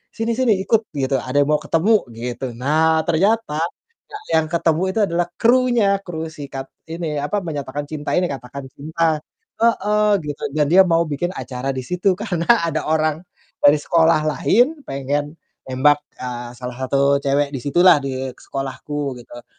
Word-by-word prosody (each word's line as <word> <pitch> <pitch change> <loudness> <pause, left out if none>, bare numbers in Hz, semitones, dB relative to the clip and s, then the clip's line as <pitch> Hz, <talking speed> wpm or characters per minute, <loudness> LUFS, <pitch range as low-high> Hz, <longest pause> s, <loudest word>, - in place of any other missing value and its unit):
sini-sini 230 +1 +1
ikut" 225 +1 +1
gitu, 135 -1 0
"ada 130 +2 -3
yang 140 - -4
mau 150 - +3
ketemu," 190 +8 +2 0.2
gitu. 120 +2 -5
Nah 160 +5 +2
ternyata 195 -1 +1 0.5
ya 420 - -6 0.2
yang 155 - -5
ketemu 165 -1 +1
itu 220 - -2
adalah 170 +1 0
krunya, 240 -4 +3
kru 160 -2 -5
sikat 140 -3 -7 0.2
ini 165 -3 -3
apa, 205 +8 -1
menyatakan 145 -3 -4
cinta 150 -1 -4
ini, 180 - +2
Katakan 135 +1 -7
Cinta, 160 +2 -1 0.4
heeh, 210 -2 +2 0.2
gitu 145 -1 -6
dan 150 -1 +3
dia 190 +2 +8
mau 165 -1 +3
bikin 155 +4 -2
acara 130 +1 -5
di 130 - -3
situ 180 +2 +1
karena 180 -6 -2 0.2
ada 155 -1 -2
orang 155 0 +1 0.4
dari 145 +1 +7
sekolah 160 0 +3
lain 250 - +2
pengen 145 +3 -2 0.3
nembak, 145 +3 +3 0.2
eee, 120 -1 -5
salah 125 -1 -6
satu 140 +1 +3
cewek 140 +1 +1
di 130 - -3
situlah, 175 +4 +5
di 130 -1 -3
sekolahku 135 +1 -5
gitu. 120 0 -12
155 Hz, 155 wpm, -20 LUFS, 140-175 Hz, 0.5 s, dia